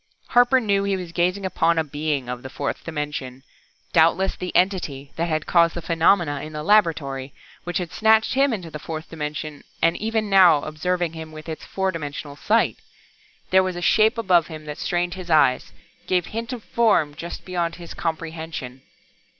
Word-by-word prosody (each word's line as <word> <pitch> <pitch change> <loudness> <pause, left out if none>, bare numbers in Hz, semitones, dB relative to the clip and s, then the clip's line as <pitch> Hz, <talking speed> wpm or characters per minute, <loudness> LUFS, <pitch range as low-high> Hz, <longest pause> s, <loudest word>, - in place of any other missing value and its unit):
Harper 245 +1 +5
knew 200 -4 +1
he 200 -1 0
was 180 -2 -7
gazing 180 +3 0
upon 170 -2 +1
a 160 - +3
being 145 -3 -2
of 125 0 -5
the 130 - -8
fourth 140 +2 -4
dimension 150 -5 -5 0.5
doubtless 170 +3 +3
the 180 - -5
Entity 165 -8 0
that 170 +1 -1
had 155 -1 -1
caused 170 -1 +3
the - - -3
phenomena 165 -3 +2
in 155 +1 -8
the 150 0 -5
laboratory, 150 -9 +1 0.3
which 175 - -2
had 175 -3 -4
snatched 220 0 +3
him 275 +1 +3
into 185 -8 -4
the 150 - -6
fourth 160 0 -7
dimension, 150 -1 -5 0.2
and 165 - +3
was - - -9
even 220 0 0
now 185 -7 +6
observing 175 +2 -2
him 160 -1 -8
with 155 +1 -10
its 160 -1 -6
four 190 -1 -1
dimensional 145 -3 -6
sight! 220 +9 +1 0.7
There 190 0 +6
was 185 -1 -2
a 175 - -5
shape 220 +4 +4
above 180 -7 +3
him 155 -2 -9
that 150 -1 -7
strained 175 0 -1
his 185 -2 -8
eyes, 150 -5 +3 0.4
gave 180 -2 +1
hint 230 +2 -5
of 245 -4 -6
Form 205 -11 +2
just 165 +3 -8
beyond 175 -2 -2
his 170 -1 -9
comprehension. 160 -5 -5
170 Hz, 185 wpm, -23 LUFS, 155-190 Hz, 0.7 s, now